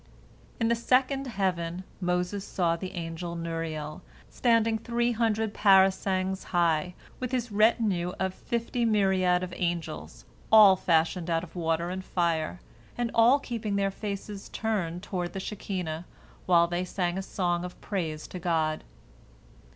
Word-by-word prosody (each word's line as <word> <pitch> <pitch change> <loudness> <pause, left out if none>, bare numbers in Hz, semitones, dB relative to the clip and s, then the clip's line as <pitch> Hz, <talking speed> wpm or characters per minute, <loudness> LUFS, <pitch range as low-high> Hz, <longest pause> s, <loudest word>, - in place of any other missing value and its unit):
In 230 - +2
the 235 - +3
second 260 +3 +1
heaven 185 -5 -2 0.2
Moses 180 +2 -1
saw 175 -4 0
the 185 +2 -6
angel 170 0 -5
Nuriel, 165 -2 -4 0.3
standing 230 -2 +2
three 235 +1 0
hundred 220 -2 0
parasangs 190 -1 +3
high, 175 0 +1 0.2
with 255 -1 -3
his 245 -3 -1
retinue 205 -4 +2
of 190 -1 -1
fifty 235 +3 -2
myriads 190 -5 +3
of 180 -1 -5
angels, 115 - -4 0.3
all 210 -3 +9
fashioned 170 0 +1
out 165 0 +1
of 180 - -11
water 170 0 -1
and 190 0 -4
fire, 170 -2 -1 0.4
and 240 -1 -1
all 235 +4 +6
keeping 225 -6 -3
their 195 0 +1
faces 200 0 -6
turned 185 -6 -2
toward 180 -2 -3
the 195 - -4
Shekinah 180 -5 -4 0.4
while 170 -2 +6
they 175 +1 -2
sang 180 -1 -2
a 190 - -2
song 175 -2 -1
of 180 0 -8
praise 160 -6 -3
to 180 - -6
God. 160 -3 0
185 Hz, 145 wpm, -28 LUFS, 170-215 Hz, 0.4 s, all